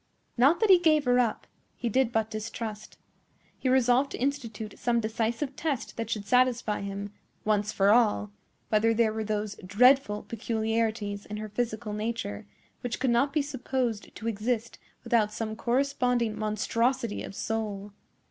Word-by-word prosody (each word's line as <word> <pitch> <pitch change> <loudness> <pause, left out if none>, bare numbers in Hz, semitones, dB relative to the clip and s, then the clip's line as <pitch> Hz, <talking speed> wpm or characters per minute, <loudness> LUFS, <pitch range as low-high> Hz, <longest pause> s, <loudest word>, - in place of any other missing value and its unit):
Not 275 +7 +4
that 435 -3 +5
he 365 - +8
gave 310 -4 +3
her 245 0 +4
up; 235 -3 0 0.3
he 240 - -3
did 245 +1 +2
but 220 -1 0
distrust. 215 0 -6 0.6
He 260 - 0
resolved 255 +1 +4
to - - -4
institute 235 -6 -3
some 240 -1 +1
decisive 230 +5 -2
test 290 -6 -3
that 230 - -4
should 210 -2 -2
satisfy 250 -3 +2
him, 200 +1 -5 0.3
once 210 -1 +1
for 200 0 +3
all, 210 -3 +3 0.4
whether 225 +1 +3
there 220 -1 +3
were 220 0 -2
those 210 -1 -3
dreadful 210 +2 +4
peculiarities 220 -2 -2
in 210 - -5
her 215 0 -5
physical 220 -1 -3
nature 210 - -4 0.3
which 245 -1 -3
could 260 - +1
not 240 +4 +3
be 300 0 +1
supposed 260 -5 -3
to 230 - -6
exist 230 +1 -2 0.2
without 230 -3 +2
some 220 0 -4
corresponding 245 -2 +1
monstrosity 230 +2 0
of - - -7
soul. 210 -2 -3
230 Hz, 155 wpm, -28 LUFS, 210-250 Hz, 0.6 s, he